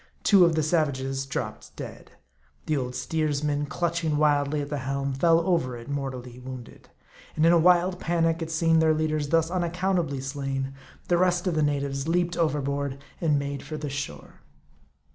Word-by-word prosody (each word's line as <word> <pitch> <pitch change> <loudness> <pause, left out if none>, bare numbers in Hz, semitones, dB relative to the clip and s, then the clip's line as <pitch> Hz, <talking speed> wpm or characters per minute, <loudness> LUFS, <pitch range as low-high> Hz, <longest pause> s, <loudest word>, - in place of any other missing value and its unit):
Two 195 -4 +7
of 170 -2 +2
the 155 - +1
savages 135 -4 0
dropped 135 - -5
dead. - - -9 0.5
The 155 - 0
old 125 -2 -3
steersman, 150 -2 -1
clutching 165 -2 -1
wildly 145 -1 +2
at 140 - -5
the 145 - -1
helm, 140 +1 -2
fell 165 +5 +4
over 165 -9 0
it, 115 - -11
mortally 130 -3 -5
wounded; 125 -1 -10 0.5
and 155 - +3
in 165 - +6
a 170 - +5
wild 180 +1 +4
panic 165 -1 +1
at 160 - -3
seeing 165 0 +3
their 160 -1 +4
leaders 155 -1 0
thus 165 +1 +2
unaccountably 175 -4 0
slain, 135 0 -3 0.3
the 175 -1 +3
rest 180 0 +2
of 180 - +1
the 155 - +1
natives 140 -1 -1
leaped 175 +1 +1
overboard 140 -3 -1 0.2
and 155 -4 +3
made 140 -1 -3
for 155 +2 -6
the 150 -1 -4
shore. 105 - -6
150 Hz, 170 wpm, -26 LUFS, 140-165 Hz, 0.5 s, Two